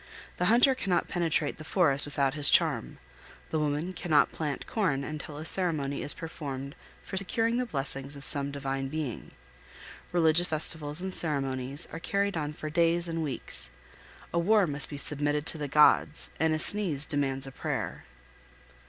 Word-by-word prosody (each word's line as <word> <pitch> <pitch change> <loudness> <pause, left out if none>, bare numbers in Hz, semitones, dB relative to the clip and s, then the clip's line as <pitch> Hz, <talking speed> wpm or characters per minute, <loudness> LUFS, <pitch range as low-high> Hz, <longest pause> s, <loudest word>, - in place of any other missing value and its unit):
The 180 - -1
hunter 240 +7 +4
cannot 195 -8 -2
penetrate 165 -4 -2
the - - -9
forest 150 -5 +3
without 140 -2 -1
his 145 -1 +10
charm; 60 - +2 0.5
the 160 - -1
woman 150 +4 -3
cannot 165 -4 +1
plant 150 -3 -5
corn 155 -11 -2
until 150 0 -8
a 155 - -8
ceremony 155 -6 0
is - - -2
performed 140 -4 -8 0.3
for 190 - -7
securing 225 +5 +2
the 250 0 -3
blessings 135 - -5
of 140 - +5
some 140 -1 +7
divine 135 -1 -5
being. 150 -3 -6 0.8
Religious 170 0 +4
festivals 155 0 +1
and 190 0 -4
ceremonies 135 -2 -3
are 165 - -6
carried 200 +3 -2
on 150 -2 -4
for 155 0 -9
days 170 +1 +1
and 165 0 -4
weeks. 145 -5 -6 0.6
A 170 - 0
war 205 +3 +2
must 145 -3 +6
be 145 - -7
submitted 145 +1 -2
to 160 - +4
the 145 - -4
gods, 150 +1 +2
and 160 0 +1
a 155 - 0
sneeze 155 -4 0
demands 135 -3 -1
a 135 - -9
prayer. - - -6
150 Hz, 165 wpm, -27 LUFS, 140-175 Hz, 0.8 s, his